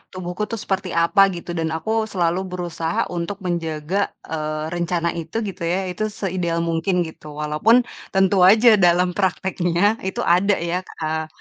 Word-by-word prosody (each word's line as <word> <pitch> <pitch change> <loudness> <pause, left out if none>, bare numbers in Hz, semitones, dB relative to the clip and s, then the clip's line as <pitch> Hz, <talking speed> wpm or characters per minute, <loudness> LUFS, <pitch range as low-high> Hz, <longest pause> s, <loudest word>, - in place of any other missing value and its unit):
tubuhku 185 +3 -4
tuh 230 - -1
seperti 190 -1 -2
apa, 195 +4 +5
gitu, 175 0 -7
dan 160 - 0
aku 160 +7 -3 0.2
selalu 175 -3 0
berusaha 170 -2 -3
untuk 175 +3 -3
menjaga, 170 +2 -1 0.2
eee, 155 -1 -3
rencana 170 0 0
itu 165 +5 -9
gitu 185 -2 -8
ya 175 - +1
itu 195 +5 -4
seideal 175 -5 -2
mungkin, 170 +3 0
gitu. 160 -1 -10
Walaupun 150 +10 +3 0.4
tentu 195 0 +3
aja 220 -1 +6
dalam 180 0 +4
prakteknya 190 +2 0
itu 190 - -2
ada 190 +4 +3
ya, 170 +2 -2 0.2
eee, 160 0 -2
175 Hz, 155 wpm, -21 LUFS, 165-195 Hz, 0.4 s, aja